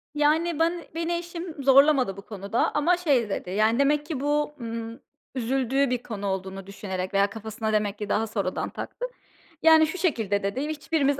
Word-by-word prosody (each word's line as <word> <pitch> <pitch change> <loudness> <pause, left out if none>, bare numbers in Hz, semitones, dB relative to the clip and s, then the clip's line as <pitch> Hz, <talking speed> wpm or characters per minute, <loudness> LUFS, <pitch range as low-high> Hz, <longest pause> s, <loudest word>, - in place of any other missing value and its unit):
Yani, 310 +2 +2
ban 335 +1 +1
beni 335 +1 -1
eşim 340 -3 -6
zorlamadı 270 -6 +5
bu - - -7
konuda 200 +2 -1
ama, 330 +4 +3
şey 275 - +2
dedi, 180 - -3
yani, 215 +5 +2
demek 295 +1 +3
ki 305 -4 -4
bu, 295 +1 0
ımm, 230 +1 -5 0.4
üzüldüğü 265 +2 +1
bir 245 -1 -1
konu 205 -3 -5
olduğunu 190 0 -4
düşünerek 190 -2 -5
veya 200 0 +3
kafasına 220 0 -4
demek 210 -1 0
ki 210 -1 -5
daha 225 +2 +1
sonradan 200 -4 -2
taktı. - - -6 0.6
Yani, 320 -1 +7
şu 345 - -5
şekilde 220 - 0
dedi 200 +7 -1
"hiçbirimiz 295 -2 0
255 Hz, 170 wpm, -26 LUFS, 205-300 Hz, 0.6 s, Yani